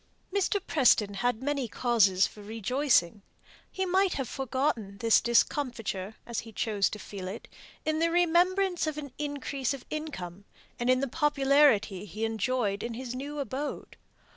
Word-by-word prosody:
Mr. 400 0 +1
Preston 225 -8 +3
had 245 +3 -1
many 280 -3 -1
causes 205 -6 +3
for 210 - -9
rejoicing: 220 - +1 0.5
he 380 - -2
might 375 0 +2
have 270 -3 -3
forgotten 260 -6 -2
this 225 +1 +4
discomfiture, 230 -5 0
as 235 -2 -3
he 225 - -9
chose 210 -2 0
to - - -6
feel 195 -3 -7
it, 200 +5 -7 0.4
in 310 0 0
the 335 +1 +3
remembrance 355 +1 +2
of 305 -1 -3
an 285 -4 -7
increase 285 -2 -2
of 270 - -13
income, 205 - -5 0.4
and 240 +1 0
in 255 0 +4
the 275 - 0
popularity 275 - +3
he 215 +3 -3
enjoyed 225 -2 -1
in 235 -1 -4
his 250 0 -5
new 285 +3 -5
abode. 280 +1 -4
255 Hz, 155 wpm, -29 LUFS, 215-295 Hz, 0.5 s, this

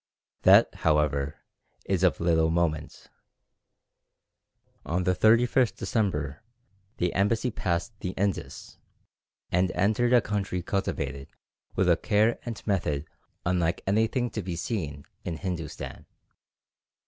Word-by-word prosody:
That, - - +6
however, 75 -2 +1 0.4
is 95 -3 0
of 90 -2 +3
little 80 -1 +3
moment. 80 -3 -1 1.8
On 90 +3 -1
the 90 +1 +2
31st 115 +4 +4
December 75 - -1 0.6
the 90 0 0
embassy 110 +5 +1
passed 90 -1 -2
the 90 - -3
Indus, 100 -1 -3 0.7
and 90 +1 +2
entered 110 +6 +2
a 125 - +8
country 100 -4 -2
cultivated 70 -8 -2 0.5
with 95 - +2
a 85 -2 +5
care 110 +5 +2
and 115 -3 -6
method 80 -8 0 0.4
unlike 85 -1 0
anything 110 +5 +1
to 110 - -3
be 90 -2 -4
seen 80 -7 -4 0.2
in 85 -2 -4
Hindustan. 85 -5 -5
90 Hz, 110 wpm, -27 LUFS, 80-105 Hz, 1.8 s, a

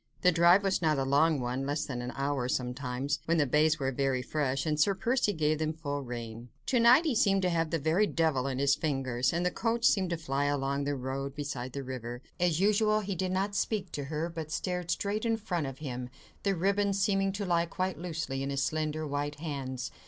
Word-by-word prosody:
The 180 - +5
drive 175 +3 +5
was 195 -2 +1
not 155 -3 +2
a 135 - +1
long 145 +3 +3
one—less 135 +5 -2
than 125 -4 -4
an 125 - -4
hour, 135 -2 -1
sometimes, 125 +2 -2
when 165 +1 +2
the 150 - +3
bays 150 +4 +3
were 135 -3 -1
very 135 -1 0
fresh, 140 -1 -1
and 155 -1 0
Sir 195 +5 +3
Percy 235 +2 +1
gave 155 -4 0
them 155 0 0
full 145 -3 -4
rein. 120 -2 -7 0.2
To 250 - +5
night 245 +8 +6
he 305 - +2
seemed 195 -3 +3
to 180 - +2
have 165 -2 0
a 165 - +2
very 160 +8 +2
devil 155 -8 +1
in 130 -2 -2
his 140 +1 +3
fingers, 135 -5 0
and 170 +1 -1
the 180 - +2
coach 230 +3 0
seemed 190 -3 +3
to 170 - -1
fly 140 -3 -1
along 140 0 0
the 145 0 0
road, 135 +1 -4
beside 135 -4 -4
the 140 - -4
river. 120 -1 -6 0.2
As 175 -2 +2
usual, 215 +2 +3
he 200 -1 -3
did 185 +1 -2
not 195 +2 0
speak 200 -2 -1
to 145 - -4
her, 155 +3 -2
but 165 -2 -6
stared 180 0 -2
straight 200 +5 -1
in 225 -1 +1
front 175 -9 -2
of 135 -1 -7
him, 125 -4 -5 0.3
the 195 -1 +1
ribbons 200 +2 +1
seeming 195 0 +2
to 200 0 -3
lie 170 -2 +2
quite 185 -1 -3
loosely 160 -6 -3
in 135 - -2
his 140 0 0
slender, 155 0 -1
white 145 0 -2
hands. 135 -4 -4
155 Hz, 225 wpm, -30 LUFS, 135-185 Hz, 0.3 s, night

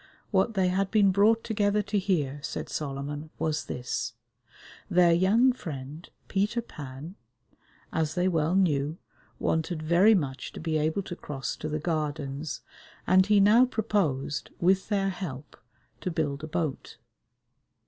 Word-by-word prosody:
What 200 +2 +2
they 185 -2 +3
had 190 +1 0
been 205 -3 +4
brought 215 +4 +4
together 210 -1 +1
to 205 +1 0
hear, 155 -8 0
said - - -5
Solomon, 145 +1 -4
was 155 -1 -1
this: 125 -2 -3 0.8
their 175 -2 +5
young 215 +9 +4
friend, 150 - -8 0.2
Peter 210 +4 0
Pan, 145 - -9 0.8
as 160 -2 0
they 180 +1 +2
well 165 -1 +1
knew, 155 -4 +1 0.4
wanted 160 0 -1
very 180 +7 +5
much 135 -7 -3
to - - -7
be 160 -1 0
able 160 +6 0
to 175 - -6
cross 135 -7 -5
to 155 - -4
the 155 - -1
Gardens, 150 -2 -3 0.4
and 185 +1 +5
he 210 -1 +5
now 210 +5 +6
proposed, 200 - -1
with 190 +3 +2
their 195 -2 +1
help, 155 -7 -6 0.4
to - - -3
build 150 -4 -2
a - - -4
boat. 155 -3 -3
170 Hz, 145 wpm, -28 LUFS, 150-195 Hz, 0.8 s, now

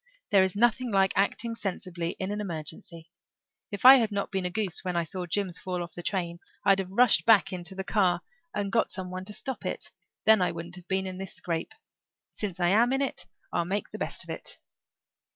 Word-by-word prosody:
There 200 -2 +6
is 190 0 +1
nothing 240 +3 +2
like 195 -1 +3
acting 215 +4 +1
sensibly 180 -5 -4
in 190 +1 -2
an 210 0 -2
emergency. 165 -1 -6 0.6
If 205 +3 -5
I 265 +1 +12
had 225 -4 +1
not 200 -1 -2
been 190 -2 -1
a - - -3
goose 195 -2 -2
when 180 -1 -2
I 170 - +2
saw 180 +2 -5
Jims 185 0 -1
fall 180 -1 -3
off 170 - -9
the 175 - -6
train 170 -2 -2 0.3
I'd 195 -1 +5
have 190 -1 -3
rushed 240 +6 +5
back 205 -3 +5
into 180 +1 -3
the 190 - -3
car 185 -4 +2 0.3
and 200 -1 -2
got 230 - +2
some 185 -1 -6
one 185 0 -5
to 210 - 0
stop 265 +4 -5
it. - - -3 0.3
Then 220 -2 +6
I 180 - +1
wouldn't 170 +1 -7
have 180 -1 -13
been 190 0 0
in 185 0 -6
this 195 -1 -5
scrape. 170 - -3 0.6
Since 195 -4 -4
I 175 -1 +3
am 230 +6 +4
in 270 +1 +2
it 270 - -3 0.3
I'll 170 - +2
make 195 +4 -3
the - - -7
best - - -2
of - - -8
it. - - -5
190 Hz, 225 wpm, -28 LUFS, 175-210 Hz, 0.6 s, I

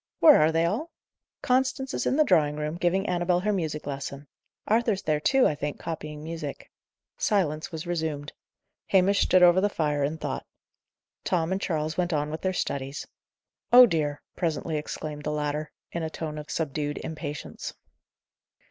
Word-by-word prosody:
"Where 305 -3 +8
are 155 +1 +4
they 165 +1 +2
all?" 225 - -1 0.5
"Constance 265 +1 +1
is - - -1
in - - +2
the 305 - +5
drawing 150 - +3
room, 150 +1 -3
giving 180 +3 +1
Annabel 180 -1 +1
her 210 +2 +1
music 155 -5 -2
lesson. 140 0 -5 0.4
Arthur's 220 -3 +2
there 155 -1 +1
too, 265 - +3
I - - +3
think, 145 0 -4
copying 150 -2 -6
music." 160 -3 -6 0.5
Silence 160 -8 0
was 160 0 -5
resumed. 160 -4 -3 0.5
Hamish 195 +1 +4
stood 185 -1 +5
over 175 +1 +6
the 205 - +2
fire 150 -6 0
in 150 +3 -1
thought. - - -4 0.8
Tom 170 -1 0
and 190 +1 -1
Charles 155 -4 -2
went 175 -1 0
on 150 0 0
with 160 - -5
their 185 - 0
studies. 140 -5 -3 0.7
"Oh 250 +1 +10
dear!" 150 -8 -1
presently 160 -1 -1
exclaimed 150 0 -5
the 150 - -2
latter, 150 0 -2 0.2
in 170 - -3
a 160 - -2
tone 155 -1 -5
of 150 - -9
subdued 145 -1 -2
impatience. 150 -3 -6
160 Hz, 165 wpm, -27 LUFS, 150-185 Hz, 0.8 s, Oh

